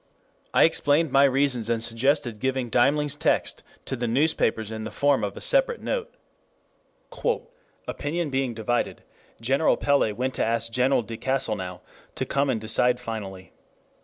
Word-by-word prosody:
I - - +5
explained 155 -1 +3
my 140 +1 +6
reasons 130 -4 +1
and 115 -1 0
suggested 120 -1 0
giving 130 -1 -1
Deimling's 145 +4 +2
text 155 +2 0 0.2
to 130 - -3
the 120 -1 -2
newspapers 115 -4 +1
in 110 0 -5
the 110 - -4
form 140 +5 +1
of - - -3
a - - -7
separate - - +2
note. 475 -2 -3 1.8
"Opinion 155 +1 -3
being 130 -3 -1
divided, 120 +2 -2 0.4
General 135 +7 +2
Pellé 140 -6 +2
went 130 +3 -2
to - - -1
ask 115 0 0
General 125 +1 +2
de 115 +1 -7
Castelnau 110 -10 -2 0.3
to - - -2
come 140 0 0
and 120 -4 0
decide 120 +3 +2
finally. 100 -6 -7
125 Hz, 150 wpm, -25 LUFS, 115-140 Hz, 1.8 s, my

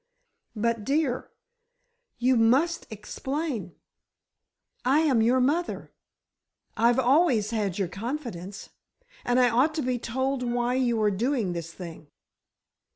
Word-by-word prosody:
"But, 230 0 0
dear, 275 0 0 0.9
you 255 +2 +3
must 265 +10 +2
explain. 230 - -4 1.1
I 275 +5 +3
am 270 -8 +3
your 245 +3 +3
mother—I've 250 -5 -2
always 260 -4 +3
had 205 -5 -1
your 195 -3 0
confidence, 200 - -6 0.5
and 245 +1 +2
I 250 -1 +5
ought 270 +7 +2
to 310 - -1
be 250 -1 -1
told 260 +3 -2
why 240 0 0
you 245 -3 +1
are 210 - +3
doing 225 -2 0
this 165 -1 -5
thing." 170 -4 -10
245 Hz, 115 wpm, -26 LUFS, 215-270 Hz, 1.1 s, I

